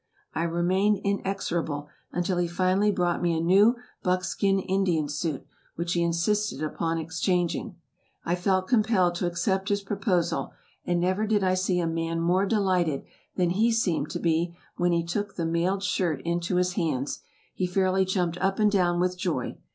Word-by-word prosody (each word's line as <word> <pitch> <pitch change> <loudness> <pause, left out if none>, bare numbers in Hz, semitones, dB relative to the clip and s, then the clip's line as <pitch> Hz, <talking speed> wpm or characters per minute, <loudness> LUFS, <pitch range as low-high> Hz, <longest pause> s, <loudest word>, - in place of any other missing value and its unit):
I 165 - -1
remained 185 +5 +2
inexorable 175 -7 -2 0.2
until 175 +1 -1
he 175 - +1
finally 185 +4 +2
brought 180 -3 0
me 170 -2 +1
a - - 0
new 195 +8 +5 0.3
buckskin 185 +2 +1
Indian 185 -5 0
suit, 145 0 -3 0.3
which 170 +1 -2
he 175 - +1
insisted 170 +3 0
upon 165 +2 -1
exchanging. 175 +5 -1 0.5
I 170 - 0
felt 185 +1 +1
compelled 215 -7 +3
to 175 - 0
accept 190 +3 -1
his 200 0 0
proposal; 195 -3 -1 0.3
and 175 0 +1
never 185 +5 +1
did 210 -2 +2
I 185 -1 +3
see 185 -1 +1
a 170 - 0
man 165 0 -1
more 180 +4 +2
delighted 185 -8 +1 0.3
than 180 -2 +1
he 220 +6 +3
seemed 175 -10 0
to - - -4
be 170 +1 0 0.2
when 175 0 +1
he 170 -1 +1
took 200 +4 -3
the 170 - -2
mailed 175 +4 0
shirt 170 -7 0
into 170 +1 -1
his 180 0 +1
hands. 150 -8 -2 0.3
He 185 - -1
fairly 190 +1 +2
jumped 180 -2 -1
up 195 +1 +1
and 210 -1 +3
down 175 -3 +2
with 180 0 0
joy. 165 -9 -2
180 Hz, 170 wpm, -26 LUFS, 170-195 Hz, 0.5 s, new